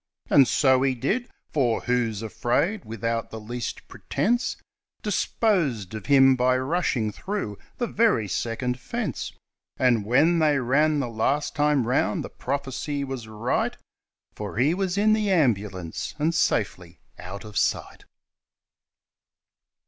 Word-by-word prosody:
And 135 -3 +7
so 130 -1 +3
he 135 -1 +2
did; 210 - -1 0.2
for 125 -6 +1
Who's 115 -4 0
Afraid, 125 - 0
without 115 +1 -3
the 110 - -7
least 120 +2 -6
pretence, 240 +3 -1 0.5
Disposed 175 - 0
of 110 - -7
him 135 -2 +6
by 125 0 +2
rushing 130 -6 0
through 115 - -4 0.2
the 240 - 0
very 220 - +2
second 120 +6 -2
fence; 230 - -4 0.5
And 120 -4 +3
when 145 +10 +3
they 150 -2 +3
ran 145 +4 +2
the 130 - -2
last 125 +6 0
time 145 -4 +2
round 125 +3 +1
the - - -7
prophecy 140 +1 -3
was 130 -4 -5
right 110 +3 -1 0.3
— - - -53
For 105 -1 -6
he 140 +7 +3
was 190 0 -1
in 215 +1 +4
the 215 -2 +1
ambulance, 105 - 0
and 160 +2 +1
safely 90 - -1 0.2
"out 95 +2 -8
of 105 -1 -11
sight". - - -1
130 Hz, 135 wpm, -25 LUFS, 115-155 Hz, 0.5 s, And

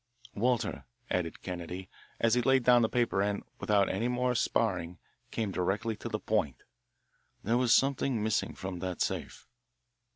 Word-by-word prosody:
"Walter," 120 +2 0 0.3
added 85 -3 -2
Kennedy, 90 +1 -5 0.3
as 115 -1 +3
he 125 - +4
laid 130 +1 +3
down 120 0 +6
the 110 - +2
paper 120 -5 +1
and, 100 0 -1 0.2
without 100 -2 +3
any 110 +6 -1
more 125 0 +1
sparring, 90 -7 0 0.3
came 110 -3 -2
directly 100 +5 -1
to - - -6
the - - -2
point, 65 -4 -1 0.8
"there 115 +4 +1
was 125 -2 +2
something 135 -4 +3
missing 110 0 0
from 95 -1 -5
that 90 -1 -4
safe." - - -3
110 Hz, 155 wpm, -30 LUFS, 95-120 Hz, 0.8 s, down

